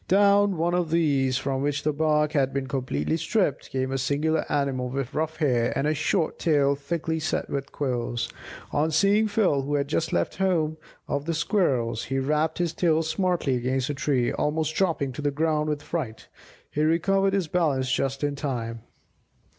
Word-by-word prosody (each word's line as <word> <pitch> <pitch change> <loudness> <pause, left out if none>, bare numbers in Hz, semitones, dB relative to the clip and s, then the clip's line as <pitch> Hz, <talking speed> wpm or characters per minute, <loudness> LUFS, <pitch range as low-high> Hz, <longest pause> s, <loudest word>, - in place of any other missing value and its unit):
Down 200 0 +4
one 170 +2 +1
of 175 -2 0
these, 140 -6 +2
from 135 -1 -2
which 145 0 -1
the 150 - +1
bark 150 0 +2
had 135 -3 +1
been 135 0 -2
completely 130 - -1
stripped, 165 - 0
came 130 0 -2
a 135 - -1
singular 150 +4 0
animal 135 -3 0
with 135 +1 -3
rough 160 +1 -2
hair, 125 -6 +2
and 135 - 0
a 155 - +2
short 160 +2 0
tail 145 -4 +3
thickly 160 +3 -3
set 160 +2 -2
with 140 0 -3
quills. 120 -4 -2 0.4
On 150 +2 +1
seeing 200 +6 +3
Phil, 200 -9 +2
who 145 +2 -2
had 140 -1 0
just 160 +2 -1
left - - -1
the - - +1
home 160 -4 +1 0.3
of 145 0 -2
the 165 0 -1
Squirrels, 135 - 0
he 135 +3 -2
rapped 150 +4 0
his 175 -2 -1
tail 165 -2 +2
smartly 175 -3 0
against 130 +3 -1
a - - -2
tree, 135 -3 0
almost 155 +1 -1
dropping 160 -7 0
to 130 - -6
the 145 - +1
ground 155 +1 0
with 150 -1 -2
fright. 135 -11 -5 0.4
He 150 - -1
recovered 195 +5 +2
his 195 -4 0
balance 145 -7 +1
just 135 +1 -1
in 145 -1 0
time. 115 -5 -4
150 Hz, 185 wpm, -26 LUFS, 135-165 Hz, 0.4 s, Down